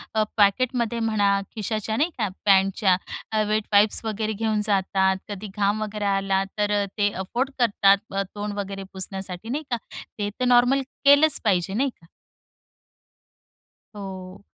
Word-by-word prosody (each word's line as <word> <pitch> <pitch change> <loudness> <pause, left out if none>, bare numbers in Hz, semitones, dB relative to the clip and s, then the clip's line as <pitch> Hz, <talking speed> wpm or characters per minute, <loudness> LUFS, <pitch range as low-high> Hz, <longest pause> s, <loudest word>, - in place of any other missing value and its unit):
अ, 215 - +3
पॅकेटमध्ये 235 +3 +2
म्हणा, 205 -3 +2 0.2
खिशाच्या 215 0 -2
नाही 310 +7 +2
का, 215 -3 0 0.2
पॅन्टच्या 195 -1 +4 0.4
अ, 215 - +1
वेट 215 0 +1
वाईप्स 205 +2 +4
वगैरे 220 0 -2
घेऊन 215 0 0
जातात. 190 -1 +1
कधी 205 +1 -6
घाम 205 +1 +1
वगैरे 210 -1 -3
आला, 195 -1 +1
तर 210 0 +1
अ, - - 0
ते 205 -1 +3
अफोर्ड 235 +9 -2
करतात, 200 -4 +4 0.2
अ, 195 - +1
तोंड 205 0 -4
वगैरे 195 0 -5
पुसण्यासाठी 190 +2 -5
नाही 295 +5 -2
का, 240 - +1 0.4
ते 205 0 -1
तर 250 - +1
नॉर्मल 245 +2 +4 0.2
केलंच 285 +1 +6
पाहिजे 190 -3 +1
नाही 270 +5 +1
का? 170 - -19 1.9
हो, 190 -1 -8
205 Hz, 150 wpm, -24 LUFS, 195-225 Hz, 1.9 s, केलंच